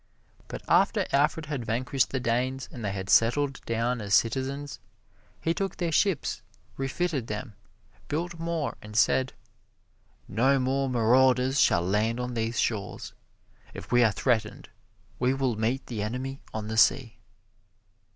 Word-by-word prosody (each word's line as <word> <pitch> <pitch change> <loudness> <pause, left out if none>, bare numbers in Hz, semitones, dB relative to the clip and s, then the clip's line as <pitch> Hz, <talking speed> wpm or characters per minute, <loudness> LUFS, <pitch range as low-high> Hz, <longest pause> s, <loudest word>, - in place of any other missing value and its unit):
But - - -7
after - - +3
Alfred 150 +3 +2
had 145 -4 -4
vanquished 125 +3 0
the 130 - -2
Danes 125 +2 -1
and 120 - -8
they 100 - -1
had 95 -1 -5
settled 135 +6 +3
down 115 +1 -1
as 100 -1 +2
citizens, 135 +6 -1 0.6
he 165 - 0
took 195 +1 -3
their 170 -2 -1
ships, 180 -1 +1 0.3
refitted 135 -1 -2
them, 105 +2 -5 0.5
built 170 +3 -3
more 165 -2 -2
and 105 0 -7
said: 130 +2 +3 0.9
"No 130 +7 +2
more 135 +1 0
marauders 130 +3 +3
shall 85 - +4
land 105 +6 0
on 125 0 -3
these 115 0 -2
shores. 105 -4 -2 0.6
If - - -9
we 120 0 +5
are 110 - +4
threatened 110 -1 -1 0.5
we 130 +2 +2
will 130 -4 0
meet 115 +5 -1
the 115 -4 -4
enemy 130 +5 -4
on 110 -1 -5
the 110 +1 -4
sea." 115 0 +3
125 Hz, 145 wpm, -27 LUFS, 115-135 Hz, 0.9 s, we